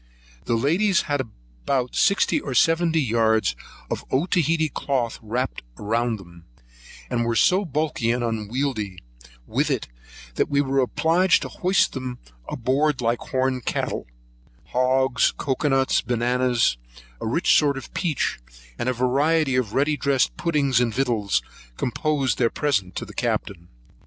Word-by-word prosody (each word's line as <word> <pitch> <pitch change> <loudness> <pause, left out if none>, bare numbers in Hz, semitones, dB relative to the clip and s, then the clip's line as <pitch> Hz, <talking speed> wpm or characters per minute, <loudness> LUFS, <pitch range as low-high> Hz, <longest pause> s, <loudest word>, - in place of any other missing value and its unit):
The 120 - +1
ladies 170 - +2
had 145 -2 -1
about 110 - -4
sixty 200 +9 +3
or - - -5
seventy 165 0 +3
yards 110 - +2 0.3
of - - -4
Otaheitee 160 +1 +1
cloth 125 -5 -1
wrapt 120 +4 -3 0.2
round 115 +2 -1
them, 85 -3 -15 0.6
and 120 - -1
were 115 0 0
so 185 - +3
bulky 150 -6 -1
and 120 +1 +1
unwieldy 110 -2 -2 0.5
with - - 0
it, - - -1 0.5
they - - +1 0.2
were 135 -1 0
obliged 165 +8 +2
to - - -5
be - - -14
hoisted 180 -7 +2
on 125 -1 -5 0.4
board 135 +3 +1
like 115 0 0
horn 130 -1 -1
cattle: - - -3 0.6
hogs, 130 +1 +2
cocoa 140 +2 -1
nuts, 135 -1 +2
bananas, 120 - +1 0.4
a - - -4
rich 165 +11 +3
sort 145 -2 +3
of 135 - -9
peach, 160 - -1 0.4
and 125 - 0
a - - +1
variety 135 +4 +2
of 120 -3 -1
ready 145 +2 +2
dressed 140 -3 +1
puddings 145 -7 +1
and 120 -3 0
victuals, 115 -7 0 0.3
composed 140 +1 0
their 120 -2 +3
present 105 - -1
to - - -4
the - - -12
Captain. 85 -3 -2
130 Hz, 140 wpm, -23 LUFS, 115-150 Hz, 0.6 s, sixty